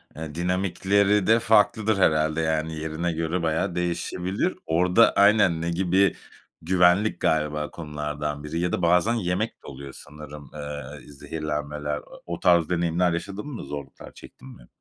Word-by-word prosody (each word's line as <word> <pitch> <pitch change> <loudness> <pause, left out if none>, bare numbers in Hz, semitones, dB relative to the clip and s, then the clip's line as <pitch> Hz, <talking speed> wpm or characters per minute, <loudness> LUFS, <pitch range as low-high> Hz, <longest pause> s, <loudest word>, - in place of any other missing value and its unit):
eee, 80 0 -7
dinamikleri 95 +3 +1
de 115 +1 +5
farklıdır 110 -1 +3
herhâlde, 80 -3 +2
yani, 80 0 -1
yerine 80 +2 -3
göre 85 +2 -2
bayağı 80 +1 -1
değişebilir. 90 - -2
Orada 90 +7 +4
Aynen. 100 -5 +4
Ne 85 - -2
gibi 95 +2 +2 0.5
Güvenlik 90 +4 +3
galiba 75 -1 0
konulardan 75 -2 -5
biri 80 +2 -4
ya 90 +1 0
da - - -1
bazen 90 +6 +3
yemek 100 0 -1
de - - -13
oluyor 70 0 -9
sanırım, 75 -1 -11
eee, 75 -1 -8
zehirlenmeler. 75 0 -4
A - - -8 0.2
o 85 -1 -5
tarz 85 -3 +3
deneyimler 85 0 +1
yaşadın 100 +7 -5
mı, 140 -6 -7
zorluklar 70 -1 -8
çektin - - -14
mi? - - -18
85 Hz, 145 wpm, -25 LUFS, 75-95 Hz, 0.5 s, de